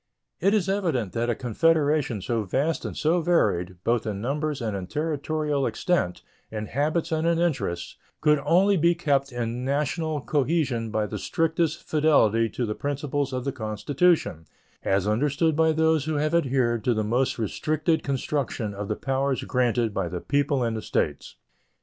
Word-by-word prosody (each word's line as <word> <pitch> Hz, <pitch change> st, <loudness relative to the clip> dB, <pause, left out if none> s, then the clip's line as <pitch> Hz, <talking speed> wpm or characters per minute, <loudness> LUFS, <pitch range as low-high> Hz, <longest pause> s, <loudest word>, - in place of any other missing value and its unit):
It 195 Hz, +4 st, +3 dB
is 195 Hz, -4 st, +1 dB
evident 165 Hz, -, -1 dB
that 120 Hz, +1 st, -1 dB
a 120 Hz, -, +1 dB
confederation 145 Hz, -, +1 dB
so 115 Hz, -2 st, 0 dB
vast 140 Hz, -, -1 dB
and -, -, -5 dB
so 170 Hz, +3 st, +2 dB
varied, 95 Hz, -, +1 dB
both 115 Hz, -1 st, +1 dB
in 100 Hz, -2 st, -3 dB
numbers 145 Hz, +5 st, -2 dB
and 110 Hz, -4 st, -2 dB
in 95 Hz, -2 st, -5 dB
territorial 150 Hz, -, -1 dB
extent, 175 Hz, -, -1 dB, 0.3 s
in 110 Hz, -1 st, -4 dB
habits 155 Hz, -, -1 dB
and 160 Hz, +1 st, +1 dB
in 170 Hz, -1 st, +2 dB
interests, 100 Hz, -, -1 dB, 0.2 s
could 150 Hz, -1 st, +3 dB
only 195 Hz, +3 st, +4 dB
be 170 Hz, +1 st, +3 dB
kept 140 Hz, -5 st, 0 dB
in 120 Hz, 0 st, -3 dB
national 150 Hz, +3 st, -1 dB
cohesion 135 Hz, -5 st, 0 dB
by 110 Hz, 0 st, 0 dB
the -, -, -5 dB
strictest 165 Hz, -1 st, 0 dB
fidelity 115 Hz, -8 st, +3 dB
to 120 Hz, -, -2 dB
the 105 Hz, -, -2 dB
principles 145 Hz, +1 st, -2 dB
of 130 Hz, 0 st, -3 dB
the 140 Hz, -, 0 dB
Constitution 110 Hz, -, 0 dB, 0.3 s
as 95 Hz, +1 st, +1 dB
understood 145 Hz, +8 st, +1 dB
by 160 Hz, +1 st, +4 dB
those 160 Hz, -2 st, +2 dB
who 155 Hz, -1 st, -1 dB
have 150 Hz, +2 st, 0 dB
adhered 125 Hz, -8 st, +1 dB
to 120 Hz, -, +2 dB
the 110 Hz, -, 0 dB
most 120 Hz, +5 st, 0 dB
restricted 155 Hz, -, 0 dB
construction 135 Hz, -5 st, -2 dB
of 100 Hz, 0 st, -5 dB
the 105 Hz, -, -1 dB
powers 135 Hz, 0 st, -1 dB
granted 120 Hz, -3 st, +1 dB
by 95 Hz, -4 st, -1 dB
the 90 Hz, -, -4 dB
people 140 Hz, +3 st, 0 dB
and 115 Hz, -1 st, -1 dB
the 110 Hz, -, -3 dB
States. 75 Hz, -7 st, -2 dB
140 Hz, 170 wpm, -25 LUFS, 115-155 Hz, 0.3 s, only